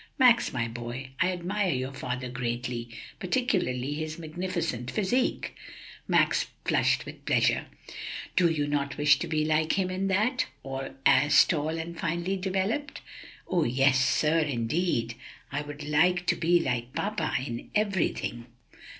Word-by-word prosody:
"Max, 250 -4 +5
my 120 -2 -1
boy, 120 +3 -6
I 185 +1 +3
admire 185 +3 -1
your 130 +1 -3
father 125 -1 -4
greatly, 120 -1 -3 0.3
particularly 180 - 0
his 155 +1 -4
magnificent 165 -7 -3
physique." 230 - 0 0.5
Max - - +3 0.2
flushed - - +2
with - - -10
pleasure. - - +2 0.7
"Do 175 -2 +4
you 150 -3 0
not 140 -1 -1
wish 145 0 +5
to 175 - -3
be 155 -1 0
like 155 0 +2
him 185 -2 0
in 190 +1 -1
that? 215 +7 +1 0.6
as 145 +1 +6
tall 160 -1 -1
and 170 +1 -6
finely 170 +4 -1
developed?" 195 +9 -2 0.5
"Yes, 135 -4 +3
sir; 155 +4 +3
yes, 150 -2 0
indeed! 120 0 0 0.4
I 140 +1 -1
want 150 +5 +1
to - - +2
be 175 +1 +3
like 125 -5 -2
papa 210 +1 -1
in 120 -2 -5
everything!" 190 - 0
155 Hz, 135 wpm, -28 LUFS, 130-185 Hz, 0.7 s, as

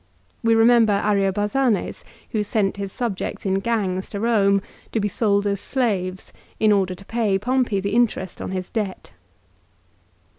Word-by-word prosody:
We 230 0 +3
remember 225 -1 +5
Ariobarzanes 205 +4 0 0.3
who 215 - 0
sent 205 -2 0
his 200 -1 -4
subjects 230 -2 -4
in 190 0 +1
gangs 195 -4 -1
to 200 - -5
Eome 200 -3 +3 0.3
to 225 - +1
be 205 - 0
sold 200 0 +1
as 200 -1 -1
slaves 195 -8 -2 0.3
in 215 -1 +4
order 190 -3 +2
to 195 - -15
pay 220 -4 +1
Pompey 245 -1 0
the 200 +1 -2
interest 225 -6 0
on - - -4
his 185 -1 -4
debt. 205 -4 -4
205 Hz, 150 wpm, -22 LUFS, 195-225 Hz, 0.3 s, remember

